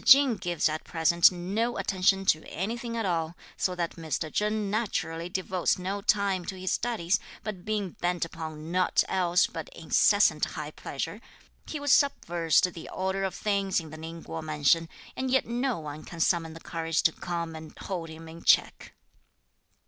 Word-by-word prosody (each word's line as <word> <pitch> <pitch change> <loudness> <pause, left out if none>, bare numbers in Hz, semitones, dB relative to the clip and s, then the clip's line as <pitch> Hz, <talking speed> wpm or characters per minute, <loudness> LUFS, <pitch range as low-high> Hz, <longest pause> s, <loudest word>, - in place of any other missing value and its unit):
Ching 270 -4 +7
gives 175 -3 0
at 155 0 -3
present 170 +1 +4
no 200 +7 -1
attention 195 0 +2
to 155 -4 +3
anything 230 - -3
at 225 - -1
all, 165 -2 -1 0.2
so 180 - -1
that 170 -1 -3
Mr. 160 -1 -3
Chen 210 -1 0
naturally 175 -6 -2
devotes 185 -1 0
no 190 +2 -3
time 200 -3 +2
to 190 - -5
his 185 0 -1
studies, 195 -7 +1 0.2
but 195 -5 -6
being 210 -4 -1
bent 175 0 -1
upon 160 -1 -7
nought 185 +1 +3
else 180 -1 +3
but - - -6
incessant - - +4
high - - -6
pleasure, - - -5 0.5
he 310 - -4
has 285 -2 +3
subversed 175 - +3
the 165 - -9
order 190 +1 -2
of 190 - -2
things 200 -2 +1
in 160 -2 -9
the 155 - -8
Ning 165 +1 -8
Kuo 165 - -5
mansion, 155 +1 +2 0.3
and 260 0 -2
yet 265 +1 +3
no 245 +2 -1
one 150 -1 -7
can 170 - -9
summon 165 -1 +1
the - - -9
courage 165 -1 -1
to 160 - +5
come 170 -1 -4
and 160 0 -10
hold 175 -4 -4
him 160 +1 -10
in 165 +1 -10
check. - - +3
180 Hz, 175 wpm, -28 LUFS, 165-200 Hz, 0.5 s, Ching